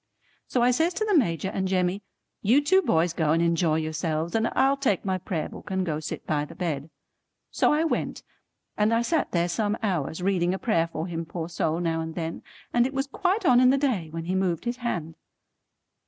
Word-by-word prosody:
So 245 Hz, -, +1 dB
I 250 Hz, -, +5 dB
says 325 Hz, +7 st, +1 dB
to 435 Hz, -, 0 dB
the 415 Hz, -3 st, +2 dB
Major 180 Hz, -, +2 dB
and 190 Hz, 0 st, -2 dB
Jemmy, 185 Hz, +1 st, 0 dB, 0.4 s
"You 235 Hz, +7 st, +4 dB
two 375 Hz, +7 st, +4 dB
boys 165 Hz, -, +2 dB
go 160 Hz, -2 st, +1 dB
and 165 Hz, -, +2 dB
enjoy 170 Hz, -1 st, +2 dB
yourselves, 160 Hz, +1 st, -2 dB
and 225 Hz, 0 st, +2 dB
I'll 270 Hz, +1 st, +4 dB
take 265 Hz, -10 st, 0 dB
my 190 Hz, -1 st, 0 dB
Prayer 170 Hz, -4 st, -3 dB
Book -, -, -11 dB
and 190 Hz, -1 st, 0 dB
go 155 Hz, -3 st, -2 dB
sit 155 Hz, -, -6 dB
by 150 Hz, -2 st, 0 dB
the 150 Hz, -, -9 dB
bed." 160 Hz, -4 st, -3 dB, 0.6 s
So -, -, +3 dB
I 300 Hz, +2 st, +2 dB
went, 330 Hz, -, -2 dB, 0.5 s
and 215 Hz, +2 st, +2 dB
I 230 Hz, -, +2 dB
sat 320 Hz, +5 st, 0 dB
there 170 Hz, -1 st, +1 dB
some 205 Hz, +4 st, -1 dB
hours, 180 Hz, -4 st, -1 dB
reading 185 Hz, -2 st, +1 dB
a -, -, -3 dB
prayer 170 Hz, -7 st, +1 dB
for 160 Hz, -1 st, -4 dB
him 165 Hz, -2 st, -4 dB
poor 165 Hz, 0 st, -5 dB
soul 165 Hz, -1 st, -1 dB
now 165 Hz, -2 st, 0 dB
and 160 Hz, 0 st, -6 dB
then, 165 Hz, -1 st, -4 dB, 0.3 s
and 240 Hz, +1 st, +4 dB
it 265 Hz, -, -8 dB
was 270 Hz, 0 st, 0 dB
quite 370 Hz, +8 st, -1 dB
on 245 Hz, -5 st, +6 dB
in 255 Hz, -, +6 dB
the 270 Hz, -, +4 dB
day 240 Hz, -, 0 dB
when 165 Hz, +1 st, -5 dB
he 180 Hz, -, -2 dB
moved 185 Hz, -2 st, 0 dB
his 240 Hz, +1 st, -2 dB
hand. 170 Hz, -10 st, -4 dB
185 Hz, 220 wpm, -26 LUFS, 165-245 Hz, 0.6 s, on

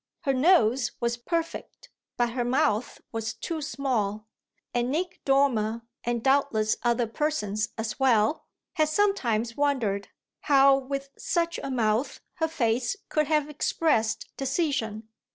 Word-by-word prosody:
Her 275 Hz, -5 st, +1 dB
nose 255 Hz, -, +3 dB
was 235 Hz, 0 st, 0 dB
perfect, 335 Hz, -, -4 dB, 0.3 s
but 240 Hz, -1 st, +1 dB
her 245 Hz, 0 st, -1 dB
mouth 250 Hz, -2 st, 0 dB
was 220 Hz, -1 st, -3 dB
too 315 Hz, +7 st, -4 dB
small; 240 Hz, -8 st, -2 dB, 0.5 s
and 240 Hz, 0 st, 0 dB
Nick 345 Hz, +6 st, -2 dB
Dormer, 235 Hz, -5 st, +2 dB, 0.2 s
and 240 Hz, -1 st, -1 dB
doubtless 265 Hz, -5 st, +2 dB
other 240 Hz, 0 st, +2 dB
persons 220 Hz, -5 st, -1 dB
as 220 Hz, +1 st, -4 dB
well, 240 Hz, 0 st, +2 dB, 0.3 s
had 310 Hz, -1 st, +2 dB
sometimes 240 Hz, -, +1 dB
wondered 240 Hz, -9 st, 0 dB, 0.3 s
how 275 Hz, -1 st, +5 dB
with 275 Hz, +1 st, -4 dB
such 335 Hz, -2 st, -1 dB
a -, -, -4 dB
mouth 230 Hz, 0 st, 0 dB, 0.2 s
her 320 Hz, -2 st, +1 dB
face 245 Hz, -1 st, 0 dB
could 305 Hz, -1 st, +1 dB
have 300 Hz, -1 st, +2 dB
expressed 255 Hz, -7 st, 0 dB
decision. 270 Hz, -7 st, -1 dB
255 Hz, 130 wpm, -27 LUFS, 225-295 Hz, 0.5 s, how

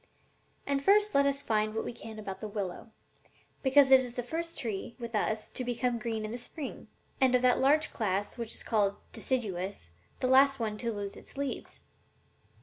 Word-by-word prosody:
And 280 Hz, -1 st, 0 dB
first 415 Hz, +4 st, +4 dB
let 280 Hz, 0 st, +4 dB
us 280 Hz, 0 st, 0 dB
find 215 Hz, -1 st, +1 dB
out 215 Hz, -, -10 dB
what 225 Hz, -, -2 dB
we -, -, -4 dB
can 225 Hz, -2 st, -9 dB
about 195 Hz, -3 st, -6 dB
the 215 Hz, -, -3 dB
willow, 200 Hz, -1 st, -5 dB, 0.7 s
because 270 Hz, 0 st, +5 dB
it 265 Hz, -, +10 dB
is 250 Hz, -2 st, -4 dB
the 245 Hz, -, -2 dB
first 335 Hz, +6 st, -4 dB
tree, 225 Hz, -1 st, -4 dB
with 235 Hz, -2 st, -7 dB
us, 215 Hz, 0 st, 0 dB
to 255 Hz, -, -4 dB
become 245 Hz, 0 st, -1 dB
green 220 Hz, -1 st, -3 dB
in 215 Hz, -, -5 dB
the 240 Hz, -, -5 dB
spring, 275 Hz, +4 st, -7 dB, 0.3 s
and, 255 Hz, -1 st, +5 dB
of 250 Hz, -, +2 dB
that 250 Hz, -1 st, +4 dB
large 300 Hz, +4 st, +3 dB
class 205 Hz, -2 st, -1 dB
which 235 Hz, -2 st, -4 dB
is -, -, -4 dB
called 205 Hz, -3 st, +2 dB, 0.2 s
deciduous, 195 Hz, -, -2 dB, 0.3 s
the -, -, -1 dB
last 270 Hz, +1 st, +5 dB
one 220 Hz, -2 st, -1 dB
to 235 Hz, +1 st, -2 dB
lose 205 Hz, -2 st, -5 dB
its -, -, -14 dB
leaves." 280 Hz, -2 st, -4 dB
235 Hz, 200 wpm, -30 LUFS, 215-270 Hz, 0.7 s, it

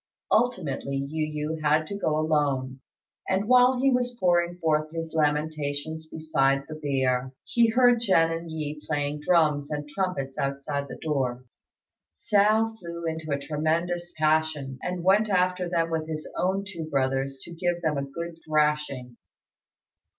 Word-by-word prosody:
Ultimately 180 Hz, -, 0 dB
Yu 150 Hz, +2 st, -2 dB
yü -, -, -11 dB
had 155 Hz, +1 st, +3 dB
to 200 Hz, -, -5 dB
go 155 Hz, -5 st, +1 dB
alone; 140 Hz, -4 st, 0 dB, 0.5 s
and 190 Hz, +2 st, +1 dB
while 250 Hz, +1 st, +5 dB
he 270 Hz, +1 st, +3 dB
was 245 Hz, -1 st, 0 dB
pouring 175 Hz, -1 st, +2 dB
forth 155 Hz, -2 st, +1 dB
his 165 Hz, 0 st, -5 dB
lamentations 155 Hz, 0 st, -1 dB
beside 140 Hz, -4 st, +1 dB
the 155 Hz, -, -7 dB
bier, 130 Hz, -4 st, 0 dB
he 235 Hz, -1 st, +3 dB
heard 245 Hz, +1 st, +4 dB
Jen 175 Hz, -7 st, +3 dB
and 165 Hz, 0 st, -4 dB
Yi 150 Hz, -1 st, -5 dB
playing 145 Hz, -1 st, -2 dB
drums 150 Hz, -3 st, +2 dB
and 150 Hz, -1 st, -4 dB
trumpets 150 Hz, -5 st, -3 dB
outside 140 Hz, +1 st, -2 dB
the -, -, -8 dB
door. 130 Hz, -5 st, -2 dB, 0.7 s
Hsiao 215 Hz, -, +3 dB
flew 170 Hz, -2 st, -7 dB
into 160 Hz, -1 st, -3 dB
a 140 Hz, -, +1 dB
tremendous 160 Hz, +4 st, -1 dB
passion, 155 Hz, -4 st, +1 dB
and 180 Hz, -1 st, -3 dB
went 205 Hz, +4 st, +4 dB
after 180 Hz, -1 st, +1 dB
them 165 Hz, -1 st, 0 dB
with 160 Hz, -1 st, -1 dB
his 155 Hz, -1 st, -5 dB
own 190 Hz, +2 st, 0 dB
two 170 Hz, -5 st, -6 dB
brothers 135 Hz, -1 st, 0 dB
to 170 Hz, -, -9 dB
give 175 Hz, 0 st, -1 dB
them 150 Hz, -3 st, +1 dB
a -, -, -2 dB
good 165 Hz, +4 st, -7 dB
thrashing. 150 Hz, -5 st, 0 dB
155 Hz, 150 wpm, -26 LUFS, 145-175 Hz, 0.7 s, while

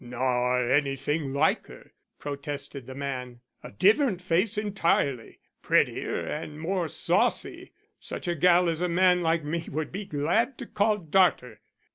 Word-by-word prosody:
"Nor 125 Hz, 0 st, 0 dB
anything 140 Hz, +2 st, 0 dB
like 140 Hz, +3 st, +1 dB
her," -, -, -14 dB, 0.3 s
protested 140 Hz, -2 st, -6 dB
the 130 Hz, -, -8 dB
man. 125 Hz, -3 st, -5 dB, 0.2 s
"A -, -, -9 dB
different 205 Hz, -, +3 dB
face 185 Hz, +4 st, 0 dB
entirely; 170 Hz, -, 0 dB, 0.2 s
prettier -, -, +1 dB
and 150 Hz, 0 st, -6 dB
more 175 Hz, +1 st, -1 dB
saucy. -, -, -1 dB, 0.3 s
Such -, -, -6 dB
a 175 Hz, -, +1 dB
gal 175 Hz, +2 st, +4 dB
as 165 Hz, 0 st, -1 dB
a 180 Hz, -, 0 dB
man 180 Hz, +1 st, +3 dB
like 165 Hz, -1 st, +1 dB
me 165 Hz, +3 st, -3 dB
would 155 Hz, +1 st, -3 dB
be 195 Hz, +2 st, -5 dB
glad 190 Hz, -, 0 dB
to 260 Hz, -, -7 dB
call 210 Hz, -1 st, +1 dB
darter." 160 Hz, -, +1 dB
155 Hz, 145 wpm, -27 LUFS, 135-180 Hz, 0.3 s, gal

